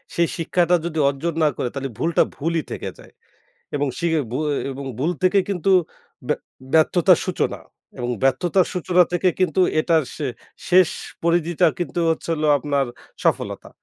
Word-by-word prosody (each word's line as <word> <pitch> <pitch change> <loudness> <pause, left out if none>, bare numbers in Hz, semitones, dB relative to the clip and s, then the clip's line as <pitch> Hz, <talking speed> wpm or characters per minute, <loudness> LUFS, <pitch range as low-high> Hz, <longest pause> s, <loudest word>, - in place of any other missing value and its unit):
সেই 170 0 +3
শিক্ষাটা 175 +1 +2
যদি 165 -2 -4
অর্জন 150 +5 -3
না - - +5
করে, - - -1
তাহলে 135 -1 -4
ভুলটা 165 0 +2
ভুলই 165 +2 -1
থেকে - - -4
যায়। - - -16 0.6
এবং 145 0 0
শিখে 165 -2 +1
ভুয়ে 150 +3 -1 0.2
এবং 135 +1 -7
ভুল 155 +6 +1
থেকে 190 +2 +4
কিন্তু 195 -1 -1 0.6
ব্য - - +1 0.4
ব্যর্থতার 170 +2 +5
সূচনা 185 - -1 0.4
এবং 120 0 -3
ব্যর্থতার 175 +7 +2
সূচনা 180 0 +3
থেকে 175 +1 +1
কিন্তু, 185 -2 +1 0.2
এটার 160 -1 +3
শে 150 - -3 0.4
শেষ 185 -1 +6 0.3
পরিধিটা 170 -1 +2
কিন্তু 175 0 -2
হচ্ছে 160 +1 -2
হল 155 -1 -3
আপনার, 140 -1 0 0.4
সফলতা। - - -1
165 Hz, 150 wpm, -22 LUFS, 150-175 Hz, 0.6 s, শেষ